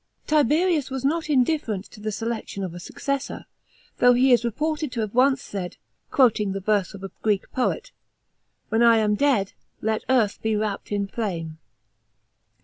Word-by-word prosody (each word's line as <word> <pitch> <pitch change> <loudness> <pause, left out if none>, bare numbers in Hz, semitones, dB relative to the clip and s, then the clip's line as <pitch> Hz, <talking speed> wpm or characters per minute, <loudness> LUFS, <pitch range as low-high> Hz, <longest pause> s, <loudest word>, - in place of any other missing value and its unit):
§ - - -35
24. 305 0 +5
Tiberius 310 +1 +2
was 265 0 -4
not 315 +2 0
indifferent 250 -7 +1
to 215 - -15
the 215 +1 -3
selection 225 -2 -4
of 180 -3 -4
a 175 - -8
successor, 275 +9 -4 0.5
though 245 0 +6
he 255 +2 +4
is 245 -1 +5
reported 305 +5 -2
to 235 - -2
have 215 -2 -3
once 265 +2 +3
said, 185 -3 -6 0.3
quoting 215 -7 +3
the 195 - -3
verse 200 -1 0
of 195 - -11
a 195 - -6
Greek 210 -3 0
poet, 260 - -1 0.4
" - - -49
When 225 - +2
I 235 -1 +6
am 210 -1 +2
dead, 210 -5 +1 0.3
let 220 0 -1
earth 235 -6 +2
be 220 -1 0
wrapt 210 -1 -3
in 205 -1 0
flame." 170 -7 -4
225 Hz, 180 wpm, -24 LUFS, 205-265 Hz, 0.5 s, though